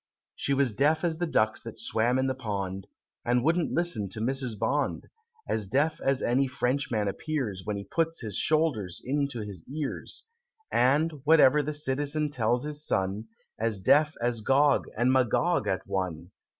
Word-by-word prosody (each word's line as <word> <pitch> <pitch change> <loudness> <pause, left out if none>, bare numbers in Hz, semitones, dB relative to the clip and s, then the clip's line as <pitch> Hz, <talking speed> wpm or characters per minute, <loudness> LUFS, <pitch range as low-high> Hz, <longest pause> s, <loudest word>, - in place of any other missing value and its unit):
She 140 - 0
was 135 -4 +2
deaf 150 - +2
as 165 -2 -1
the 175 - 0
ducks 110 -8 +1
that 115 - -9
swam 120 +3 0
in 130 - +1
the 130 - 0
pond, 100 -6 -4 0.4
And 120 0 +1
wouldn't 165 +3 +1
listen 165 - 0
to 110 - -5
Mrs. 125 -1 -2
Bond, - - -1 0.4
As 105 -3 -1
deaf 145 +9 0
as 135 -1 +1
any 135 +3 +2
Frenchman 125 -4 -1
appears, 115 -4 -3
When 105 0 -3
he 100 - -5
puts 165 - -1
his 110 -5 -5
shoulders 140 - +1
into 140 -2 -1
his 100 -6 -7
ears: 145 +1 -5 0.5
And 145 +4 +2
whatever 150 -2 +6
the 150 +1 -3
citizen 145 +1 0
tells 120 -2 0
his 150 0 -3
son 100 -1 -1 0.3
As 110 -2 0
deaf 150 +10 +4
as 120 -1 -1
Gog 140 +5 +3
and 125 +3 +3
Magog 130 - +2
at 95 -2 -1
one! 90 -2 -3
130 Hz, 165 wpm, -28 LUFS, 110-150 Hz, 0.5 s, whatever